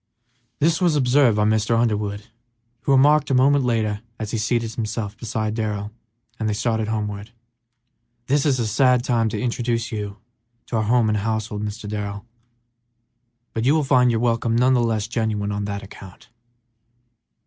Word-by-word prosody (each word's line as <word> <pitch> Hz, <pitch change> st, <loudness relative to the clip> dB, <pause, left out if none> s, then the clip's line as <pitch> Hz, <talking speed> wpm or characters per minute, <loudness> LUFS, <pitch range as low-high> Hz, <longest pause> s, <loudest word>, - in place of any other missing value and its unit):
This 165 Hz, +3 st, +1 dB
was 175 Hz, -4 st, +3 dB
observed 130 Hz, -4 st, +3 dB
by 105 Hz, -, +3 dB
Mr. 110 Hz, +1 st, +2 dB
Underwood, 105 Hz, -2 st, -1 dB, 0.6 s
who -, -, -1 dB
remarked 145 Hz, +2 st, +4 dB
a 135 Hz, -, +2 dB
moment 135 Hz, +2 st, +4 dB
later 110 Hz, -4 st, 0 dB, 0.2 s
as 110 Hz, -1 st, -5 dB
he 115 Hz, -, -1 dB
seated 115 Hz, 0 st, -1 dB
himself 110 Hz, -2 st, -4 dB
beside 110 Hz, -2 st, -3 dB
Darrell 105 Hz, -2 st, -3 dB, 0.5 s
and 110 Hz, -1 st, -1 dB
they 105 Hz, -, -1 dB
started 110 Hz, 0 st, -1 dB
homeward, 105 Hz, -1 st, -3 dB, 1.0 s
"This 140 Hz, +2 st, +2 dB
is 140 Hz, -4 st, +2 dB
a 115 Hz, -, 0 dB
sad 125 Hz, +3 st, +3 dB
time 115 Hz, -3 st, +1 dB
to 105 Hz, -, -4 dB
introduce 120 Hz, 0 st, -1 dB
you 105 Hz, -2 st, -5 dB, 0.5 s
to 115 Hz, -, -2 dB
our 110 Hz, -, +1 dB
home 120 Hz, 0 st, +3 dB
and 105 Hz, -1 st, +1 dB
household, 110 Hz, -1 st, -2 dB
Mr. 105 Hz, +1 st, -5 dB
Darrell, 100 Hz, -1 st, -5 dB, 1.3 s
but 115 Hz, -, -2 dB
you 140 Hz, +5 st, +4 dB
will 155 Hz, -, +2 dB
find 130 Hz, -2 st, +4 dB
your 115 Hz, -2 st, +1 dB
welcome 115 Hz, -1 st, +1 dB
none 125 Hz, +2 st, +4 dB
the 125 Hz, -, +3 dB
less 110 Hz, -3 st, 0 dB
genuine 110 Hz, -3 st, -1 dB
on 100 Hz, 0 st, -2 dB
that 100 Hz, 0 st, -4 dB
account." 95 Hz, -1 st, -13 dB
110 Hz, 170 wpm, -22 LUFS, 105-125 Hz, 1.3 s, remarked